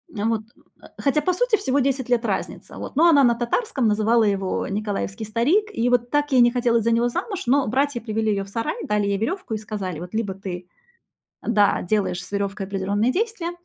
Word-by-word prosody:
А 205 - -2
вот, 225 -1 +1
э, - - -25 0.2
а. - - -15
Хотя, 290 +2 +1
по 365 - +1
сути, 465 +4 +2
всего 270 -4 0
10 265 -2 0
лет 240 -1 +2
разница, - - -4
вот. - - -7
Но 325 +5 +5
она 285 -4 +6
на 240 -2 +4
татарском 240 - 0
называла 220 +2 +3
его 195 -2 0
"николаевский 205 +1 -3
старик". 245 - +2
И 235 +2 +1
вот 245 -1 +1
так 290 0 0
ей 255 - +5
не 240 0 +5
хотелось 235 -2 +1
за 230 - +2
него 235 +1 +2
замуж, 390 - -4
но 270 +3 +2
братья 265 +2 0
привели 220 -1 -2
её 195 -1 -1
в 195 - -14
сарай, 230 +3 -2
дали 210 -1 0
ей 200 0 0
верёвку 235 - -3
и - - 0
сказали: 205 -6 -5
"Вот 175 +3 -9
либо 220 -3 -1
ты" 185 -2 -7 0.8
Да, 205 -3 +3
"Делаешь 185 -2 -1
с 185 - -12
верёвкой 200 -1 -2
определённые 200 +4 0
действия, 400 - -2
230 Hz, 215 wpm, -23 LUFS, 205-265 Hz, 0.8 s, она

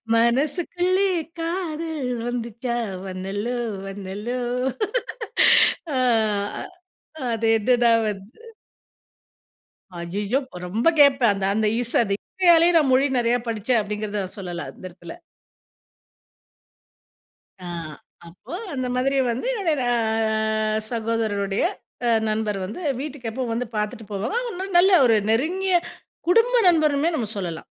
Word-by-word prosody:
மனசுக்குள்ளே 345 +10 +1 0.3
காதல் 325 -5 -3 0.2
வந்துச்சா, 235 0 -3 0.3
வந்தல்லோ, 195 +6 -3 0.3
வந்தல்லோ. 205 +5 -5 1.6
ஆ 260 - +1 1.3
அது 225 0 -1
எதுடா 240 +1 +3 0.2
வந்து 205 +3 -7 1.6
அய்யயோ! 200 +8 -1 0.3
ரொம்ப 215 - -1
கேப்பேன் 270 -6 +6
அந்த 195 -1 -2
அந்த 215 0 +2
இச 240 - -2
அந்த 200 -3 -2
இசையாலே 345 -2 +4
நான் 300 -4 +3
மொழி 265 +2 +4
நறைய 240 0 +2
படிச்சேன் 230 +2 +1
அப்டிங்கறத 210 -1 -3
சொல்லலாம் 175 -7 -5
அந்த - - -13
இடத்துல. 175 -1 -11 2.5
ஆ 180 - -10 0.6
அப்போ 170 - -12 0.2
அந்த 255 -2 -2
மாதிரி 270 +2 +1
வந்து 235 - -4
என்னுடைய 325 -6 0 0.2
அ 220 -1 0
சகோதரருடைய 220 -4 -1 0.4
அ - - +3 0.2
நண்பர் 215 -1 -1
வந்து 215 - -7 0.2
வீட்டுக்கு 280 -5 -5
எப்போ 260 +3 -3
வந்து 240 +2 -2
பார்த்துட்டு 210 +1 -3
போவாங்க. 380 - -3
நல்ல 380 +3 +5
ஒரு 225 -3 +4
நெருங்கிய 360 +10 +1 0.5
குடும்ப 460 +6 +4
நண்பருமே 310 -1 +2
நம்ம 225 -6 -2
சொல்லலாம் 170 -4 -4
235 Hz, 105 wpm, -23 LUFS, 210-290 Hz, 2.5 s, கேப்பேன்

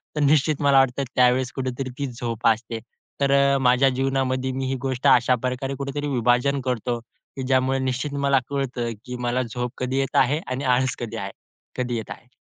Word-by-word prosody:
तर 150 - 0
निश्चित 150 +1 +3
मला 140 -1 +5
वाटतं 135 +1 +2
त्यावेळेस 125 0 +3
कुठेतरी 130 0 -3
ती 140 - -1
झोप 115 -2 -2
असते. 115 0 0 0.4
तर 140 0 +3
अ, 140 0 +4
माझ्या 130 +1 +4
जीवनामध्ये 130 0 0
मी 130 0 -3
ही 135 - -1
गोष्ट 130 -2 -1
अशाप्रकारे 125 +2 +2
कुठेतरी 140 +1 -3
विभाजन 125 +2 +2
करतो, 120 -1 -1 0.4
की 135 - -4
ज्यामुळे 130 0 +2
निश्चित 130 +2 -2
मला 140 -1 +2
कळतं, 125 -4 -2
की 125 0 -6
मला 125 +1 +1
झोप 125 +1 -4
कधी 130 +1 -2
येत 135 - -2
आहे 145 +5 0
आणि 130 +2 -3
आळस 130 0 +2
कधी 115 -1 -5
आहे? 100 -1 -4 0.5
कधी 125 -1 -1
येत 110 - -6
आहे. 120 - -10
130 Hz, 185 wpm, -23 LUFS, 125-135 Hz, 0.5 s, मला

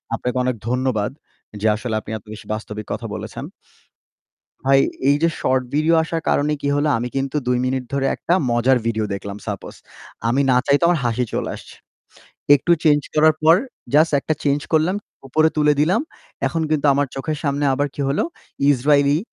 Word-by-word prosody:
আপনাকে 125 +2 -3
অনেক 125 -1 0
ধন্যবাদ, 125 -4 0 0.5
যে 110 - +2
আসলে 110 +1 -3
আপনি - - -10
এত 100 - -17
বেশি 110 - -11
বাস্তবিক 105 -1 -6
কথা - - -5
বলেছেন। - - -7 1.2
ভাই, 135 0 +5 0.3
এই 140 - +5
যে 165 - +5
শর্ট 130 0 +1
ভিডিও 155 +3 +3
আসার 165 0 -3
কারণে 145 +1 +2
কী 140 - 0
হলো? 145 +1 +1
আমি 120 - -3
কিন্তু 135 +2 -2
২ 125 0 +2
মিনিট 130 0 -1
ধরে 135 -1 +1
একটা 175 - 0 0.2
মজার 125 +2 +3
ভিডিও 110 -2 0
দেখলাম 100 0 -6
suppose, 100 -3 -6 0.5
আমি 130 +4 +2
না 125 - +4
চাইতেও 145 +4 +4
আমার 175 -3 +2
হাসি 120 +1 0
চলে - - -2
আসছে। - - -13 0.8
একটু 145 +5 +2
চেঞ্জ 150 -1 +4
করার 155 0 +5
পর 160 +1 +7 0.4
জাস্ট 155 +2 +6
একটা 155 - -1
চেঞ্জ 145 0 +2
করলাম, 160 +5 +2 0.3
উপরে 155 +4 +3
তুলে 150 0 +4
দিলাম। 180 +9 +3 0.5
এখন 165 -1 -1
কিন্তু 150 -1 +1
আমার 145 +1 +1
চোখের 150 +3 -3
সামনে 140 0 0
আবার 145 +2 0
কী - - -6
হলো, 140 - +1 0.5
ইসরাইলি 140 +2 +3
140 Hz, 175 wpm, -21 LUFS, 125-155 Hz, 1.2 s, পর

